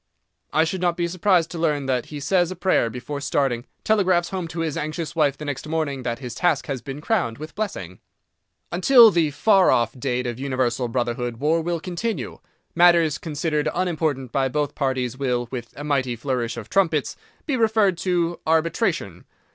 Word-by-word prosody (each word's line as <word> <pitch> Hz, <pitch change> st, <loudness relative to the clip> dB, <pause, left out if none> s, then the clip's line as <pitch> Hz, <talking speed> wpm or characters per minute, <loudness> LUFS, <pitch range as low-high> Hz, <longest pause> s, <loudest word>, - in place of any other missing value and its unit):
I 155 Hz, -, +3 dB
should 175 Hz, +3 st, -2 dB
not 175 Hz, -1 st, +1 dB
be 170 Hz, -1 st, 0 dB
surprised 180 Hz, -1 st, +2 dB
to 170 Hz, -, -5 dB
learn 150 Hz, -4 st, 0 dB
that 130 Hz, -2 st, -1 dB
he 150 Hz, -, -7 dB
says 175 Hz, +4 st, +2 dB
a 185 Hz, -, -5 dB
prayer 180 Hz, -9 st, +2 dB
before 125 Hz, +5 st, -6 dB
starting, 135 Hz, -4 st, 0 dB, 0.2 s
telegraphs 185 Hz, -5 st, +2 dB
home 185 Hz, -3 st, -3 dB
to 165 Hz, 0 st, -5 dB
his 160 Hz, -3 st, -2 dB
anxious 155 Hz, +2 st, -4 dB
wife 145 Hz, -4 st, +2 dB
the 150 Hz, -, -7 dB
next 145 Hz, 0 st, -4 dB
morning 155 Hz, -4 st, -2 dB
that 120 Hz, -1 st, -3 dB
his 125 Hz, -2 st, -7 dB
task 160 Hz, 0 st, +1 dB
has 135 Hz, -4 st, -4 dB
been 140 Hz, +1 st, -7 dB
crowned 165 Hz, -, 0 dB
with 155 Hz, +2 st, -8 dB
blessing. 95 Hz, -, -5 dB, 0.7 s
Until 230 Hz, +6 st, +7 dB
the 165 Hz, -4 st, +2 dB
far 195 Hz, +5 st, +4 dB
off 115 Hz, -1 st, +2 dB
date 125 Hz, -1 st, -1 dB
of 120 Hz, 0 st, -4 dB
Universal 130 Hz, -2 st, -1 dB
Brotherhood 120 Hz, 0 st, -2 dB
war 155 Hz, +5 st, +1 dB
will 170 Hz, +1 st, -2 dB
continue. 180 Hz, -, -4 dB, 0.3 s
Matters 170 Hz, -3 st, +4 dB
considered 150 Hz, -1 st, -1 dB
unimportant 155 Hz, -8 st, -1 dB
by 135 Hz, -1 st, +1 dB
both 145 Hz, +2 st, -1 dB
parties 130 Hz, -3 st, -1 dB
will—with 120 Hz, -2 st, -2 dB
a 145 Hz, -, -6 dB
mighty 135 Hz, -4 st, 0 dB
flourish 120 Hz, -1 st, -2 dB
of 115 Hz, -, -7 dB
trumpets—be 195 Hz, -, -1 dB
referred 220 Hz, -5 st, +3 dB
to 175 Hz, -2 st, 0 dB
arbitration. 160 Hz, -, 0 dB
150 Hz, 175 wpm, -23 LUFS, 130-175 Hz, 0.7 s, Until